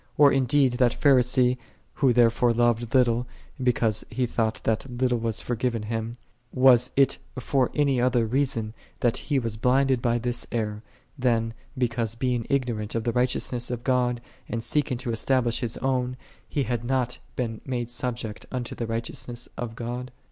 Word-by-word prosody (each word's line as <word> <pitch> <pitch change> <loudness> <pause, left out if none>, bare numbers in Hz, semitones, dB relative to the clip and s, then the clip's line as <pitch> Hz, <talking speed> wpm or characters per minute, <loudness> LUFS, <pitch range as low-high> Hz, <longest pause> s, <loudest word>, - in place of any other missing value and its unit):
Or 145 -1 +7
indeed 135 0 +3
that 120 -1 +4
Phari 140 -3 +6
i - - +5
see," 125 0 +3 0.4
who 135 -3 +3
therefore 120 0 +4
loved 120 0 +1
little, 120 -1 +3 0.3
because 115 -4 +1
he 125 +2 0
j 120 - -8
thought 110 -1 0
that 110 +4 0
little 125 0 0
was 115 -1 -2
forgiven 120 -1 -1
him, 115 +2 -4 0.3
was 125 -2 +5
it 135 -1 +3 0.2
for 130 0 +1
any 140 -4 +2
other 125 -2 +2
reason 115 -3 0 0.3
that 120 -2 +2
he 145 - -1
was 115 -4 -1
blinded 130 +2 +2
by 120 -1 +2
this 120 +1 -2
error, 105 -2 -2 0.4
than 115 -3 +1 0.2
because 120 -3 -1
being 125 -1 -1
ignorant 120 -6 -1
of 115 - 0
the 120 - 0
righteousness 125 -1 0
of 120 -1 -4
God, 125 -2 +1 0.3
and 115 -1 -3
seeking 145 -3 0
to 125 -1 -4
estab 125 +3 +1
lish 120 0 +1
his 120 -2 -3
own, 125 -1 -1 0.3
he 140 - 0
had 120 -2 -2
not 125 0 -1 0.2
been 115 -3 -3
made 120 -2 -3
subject 120 -3 -4
unto 125 -2 -4
the 115 - -4
righteousness 115 +1 -4
of 115 -2 -5
God 125 +2 -5
120 Hz, 175 wpm, -26 LUFS, 115-130 Hz, 0.4 s, Or